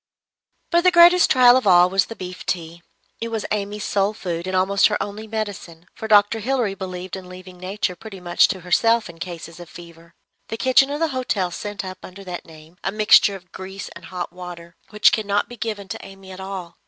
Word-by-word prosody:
But 345 0 +4
the 365 - +6
greatest 350 0 +6
trial 250 -1 +7
of 255 -5 +1
all 180 -1 +7
was 190 +1 +1
the 225 - -8
beef 180 -2 -8
tea. 170 -1 -4 0.4
It 230 - -3
was 225 -2 -4
Amy's 210 0 -3
sole 200 +1 0
food, 175 -3 -4
and 185 - -2
almost 195 +2 +3
her 210 - -1
only 205 +2 -5
medicine; 205 -6 -6
for 220 - -7
Dr. 210 +1 +4
Hilary 240 -3 0
believed 185 -1 -6
in 185 -1 -10
leaving 180 0 -12
Nature 185 0 -3
pretty 195 +1 -10
much 175 -1 +3
to 190 -2 -4
herself 225 +4 +2
in 165 - -20
cases 170 -2 -8
of 175 -1 -11
fever. 170 -1 -14 0.3
The 225 - -5
kitchen 260 +2 +4
of 290 +1 -3
the 325 -1 +1
hotel 235 -9 -1
sent 205 +3 -6
up, 185 0 -8
under 190 +2 -11
that 180 -2 -7
name, 160 +1 -16
a 195 - -1
mixture 210 -1 +5
of 180 -2 -14
grease 190 +1 -8
and - - -13
hot 180 -1 -6
water, 175 -2 -10
which 210 0 +4
could 220 -2 -1
not 205 0 +1
be 240 - -10
given 210 -3 -5
to - - -6
Amy 195 -1 -12
at 185 - -10
all. 190 -3 -7
195 Hz, 215 wpm, -22 LUFS, 180-215 Hz, 0.4 s, trial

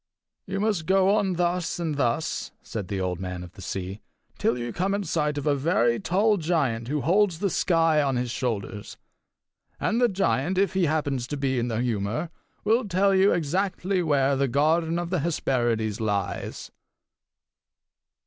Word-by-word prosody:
"You 195 +1 -2
must 205 -6 0
go 190 +1 +4
on 200 -3 +1
thus 175 0 0
and 165 -3 -2
thus," 140 +2 -1
said 105 -4 -5
the 100 0 -3
Old 90 -2 -2
Man 90 -1 -5
of 90 - -10
the 95 - -13
Sea, 95 +2 -5 0.4
"till 120 - +1
you 120 -1 -4
come 190 +3 0
in 205 - -2
sight 150 -3 -1
of 145 - -3
a 150 - +3
very 135 -5 +2
tall 205 +4 +2
giant 145 -10 0
who 145 +2 -1
holds 185 +4 +2
the 195 +2 -1
sky 165 -3 +3
on 135 -2 0
his 125 -1 -1
shoulders. 110 -4 -4 0.8
And 235 - 0
the 245 - +5
giant, 180 - 0
if 195 +1 +2
he 190 -2 +2
happens 145 -5 -1
to 145 - -4
be 135 -2 0
in 120 - -1
the 115 -1 -1
humour, 115 - -2 0.3
will 225 +2 +2
tell 195 +1 +2
you 190 +1 +5
exactly 185 +3 0
where 140 -4 +2
the 135 +1 +1
garden 160 +5 +2
of 175 0 -3
the 180 - +1
Hesperides 120 -8 0
lies." 100 -3 -3
150 Hz, 175 wpm, -26 LUFS, 120-180 Hz, 0.8 s, the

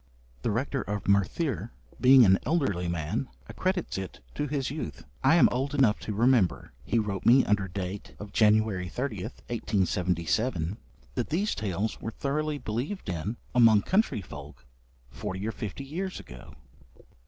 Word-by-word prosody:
The - - -1
rector 130 +5 -1
of 100 -2 -4
Merthyr, 100 - +1 0.3
being 130 -1 +8
an 95 -1 +5
elderly 130 - 0
man, 85 - -2 0.2
accredits 185 - -2
it 95 -2 -7
to 145 - -2
his 135 -2 -2
youth. 85 - -6 0.2
'I 165 - +6
am 170 - +6
old 135 +3 -1
enough 125 -7 +4
to 105 - -4
remember,' 115 -4 +2
he 115 - 0
wrote 105 -4 -1
me 130 +3 +6
under 100 -2 +1
date 95 +2 -6
of 105 0 -9
January 105 -4 +3
30th, 115 -2 -5
1877, 90 -2 0 0.4
'that - - -2
these 195 +7 0
tales 105 0 -2
were - - -3
thoroughly 150 +5 -2
believed 125 - -4
in 90 +7 -3 0.2
among 115 -4 +6
country 195 - +1
folk - - -11 0.5
forty 95 +10 -5
or - - 0
fifty 110 +5 -6
years 180 +7 -4
ago.' 60 0 -12
110 Hz, 150 wpm, -28 LUFS, 95-135 Hz, 0.5 s, being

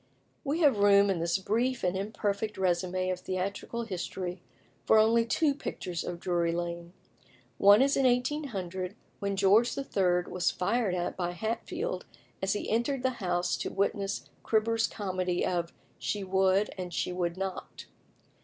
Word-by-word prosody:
We 305 +4 -1
have 280 -9 +4
room 200 0 +6
in 180 - -1
this 170 +2 +1
brief 235 +7 0
and 180 0 +1
imperfect 205 +1 -2
résumé 185 0 0
of 180 - -7
theatrical 190 +5 -3
history 180 -3 -4 0.4
for 220 - +5
only 230 +2 +4
two 295 +5 +2
pictures 180 - -5
of 175 -1 -5
Drury 175 -2 0
Lane. 170 0 -4 0.7
One 205 +5 +7
is 275 +1 +2
in 270 - +2
1800, 230 - -1 0.2
when 200 -1 -1
George 200 +5 +4
III. 185 -10 +1
was 180 -1 0
fired 205 0 0
at 175 -1 -2
by 175 -1 -2
Hatfield 325 - -3 0.3
as 190 0 +1
he 205 - -3
entered 245 +4 0
the 260 - +2
house 175 -1 0
to - - -3
witness 200 0 -1 0.2
Cribber's 225 +1 +2
comedy 185 -3 -2
of 170 -2 -1 0.3
"She 205 -1 -2
Would 190 +2 +2
and 180 -1 -4
She 180 - -2
Would 175 -1 -2
Not." 190 -1 -5
195 Hz, 155 wpm, -29 LUFS, 180-225 Hz, 0.7 s, One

